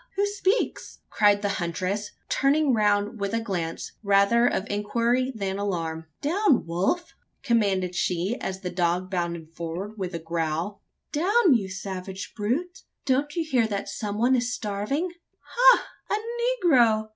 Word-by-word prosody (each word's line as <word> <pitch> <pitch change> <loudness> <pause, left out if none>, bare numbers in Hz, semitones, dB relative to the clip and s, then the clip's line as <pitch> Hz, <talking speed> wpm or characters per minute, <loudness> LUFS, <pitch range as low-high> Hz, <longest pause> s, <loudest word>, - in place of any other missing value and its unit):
who 400 +1 +2
speaks?" 405 +2 -1
cried 205 -1 +3
the - - +2
huntress, 185 +5 -2 0.2
turning 280 0 +2
round 210 0 +1
with 200 +2 -1
a - - +1
glance 180 -7 -4
rather 200 +4 +4
of 190 - 0
inquiry 235 +5 0
than 195 -2 -3
alarm. 165 -5 -3 0.2
"Down, 345 - +2
Wolf!" 190 - -1 0.3
commanded 200 -8 +1
she, 180 +4 0
as 190 0 -4
the 180 -2 -4
dog 180 +1 0
bounded 170 -3 -3
forward 175 +6 -5
with 180 -2 -3
a - - 0
growl. 165 +4 -2 0.3
"Down, 365 - +4
you 205 -6 +1
savage 190 0 -6
brute! 290 - -2 0.2
Don't 280 +2 +1
you 335 - 0
hear 250 -7 +2
that 200 -2 -3
some 210 -2 -4
one 245 +4 +3
is 245 -1 0
starving? 230 - -2 0.3
Ha! - - +5 0.2
a 470 +1 -1
negro! 225 -8 +4
210 Hz, 145 wpm, -26 LUFS, 185-270 Hz, 0.3 s, Ha